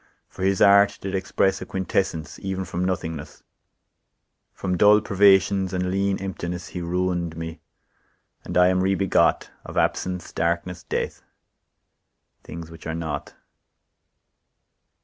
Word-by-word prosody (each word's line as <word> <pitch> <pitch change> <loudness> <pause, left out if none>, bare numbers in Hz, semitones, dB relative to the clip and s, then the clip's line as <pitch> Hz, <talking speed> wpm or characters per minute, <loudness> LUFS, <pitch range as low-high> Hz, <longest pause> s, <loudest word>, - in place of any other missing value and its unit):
For - - -12
his 95 0 +3
art 100 0 +6
did 95 0 -5
express 95 0 0
A - - -5
quintessence 95 -3 -2
even 95 -1 -3
from 85 +1 -3
nothingness, 80 -5 -4 1.1
From 90 -1 -3
dull 105 +3 +6
privations, 95 -2 +3
and 90 0 -1
lean 100 0 +1
emptiness; 90 -2 -5
He 90 - -5
ruin'd 85 -1 -1
me, 80 0 -6 0.8
and 90 - -3
I 90 0 +6
am 95 0 +2
re 95 +1 +2
begot 95 0 +2
Of - - -8
absence, 90 -1 -1
darkness, 85 +2 -1
death—things 80 0 -9
which 80 0 -10
are 80 - -3
not. 80 -4 -5
90 Hz, 125 wpm, -24 LUFS, 85-95 Hz, 1.1 s, art